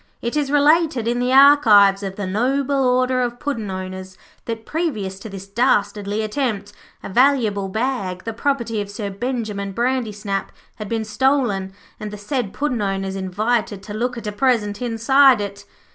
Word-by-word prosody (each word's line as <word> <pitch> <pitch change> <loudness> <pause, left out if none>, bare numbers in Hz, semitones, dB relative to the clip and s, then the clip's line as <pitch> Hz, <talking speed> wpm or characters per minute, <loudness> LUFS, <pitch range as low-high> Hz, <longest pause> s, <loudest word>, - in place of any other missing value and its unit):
It 235 +3 -3
is 295 -2 0
related 295 -3 +3
in 240 +1 0
the 250 +1 0
archives 230 -8 +6
of 195 -1 -5
the 205 - -4
Noble 265 +7 0
Order 255 0 +2
of 240 -1 -2
Puddin' 230 -8 -3
owners 185 0 -7 0.3
that 225 -1 -5
previous 220 - -3
to 220 - -9
this 195 -1 -8
dastardly 205 -1 0
attempt 215 -3 -2 0.3
a - - -6
valuable 220 -4 +2
bag, 200 -5 -2
the 225 - -4
property 235 -3 -1
of 200 - -6
Sir 205 0 -5
Benjimen 210 -3 -4
Brandysnap, 215 -5 -2 0.3
had 215 -2 -7
been 225 -1 -2
stolen 215 -4 0 0.3
and 215 - -5
the 210 - -8
said 215 0 -3
Puddin' 250 -4 -2
owners 195 -1 -2
invited 200 +2 -1
to 205 - -8
look 245 +3 -2
at 230 - -7
a 210 - -2
present 210 -2 0
inside 250 +2 +4
it. 200 0 -6
220 Hz, 165 wpm, -21 LUFS, 200-255 Hz, 0.3 s, archives